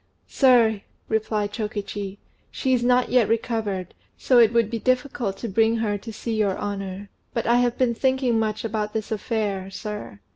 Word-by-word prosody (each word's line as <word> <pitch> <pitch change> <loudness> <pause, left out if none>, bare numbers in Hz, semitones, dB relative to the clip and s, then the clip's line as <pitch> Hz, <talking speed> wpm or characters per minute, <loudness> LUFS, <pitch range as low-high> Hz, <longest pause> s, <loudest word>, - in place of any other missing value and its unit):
"Sir," 235 -6 +4 0.3
replied 215 -2 -1
Chokichi, 205 -2 -4 0.3
"she 260 -2 -1
is 245 -1 +2
not 250 0 +3
yet 245 -3 +3
recovered; 220 -5 -1 0.2
so 250 -2 +4
it 225 -2 +6
would 230 -2 +2
be 230 - -2
difficult 250 -5 0
to 235 - -5
bring 225 +2 +2
her 215 -2 0
to 225 +3 -7
see 225 +2 -4
your 205 -3 +1
honour. 200 -1 -5 0.2
But 230 - -1
I 235 +1 +4
have 245 -1 +1
been 250 -2 +2
thinking 260 -2 +1
much 215 0 -2
about 215 -1 -2
this 220 -1 -3
affair, 210 -3 -2
sir. 210 - -7
220 Hz, 175 wpm, -24 LUFS, 205-240 Hz, 0.3 s, it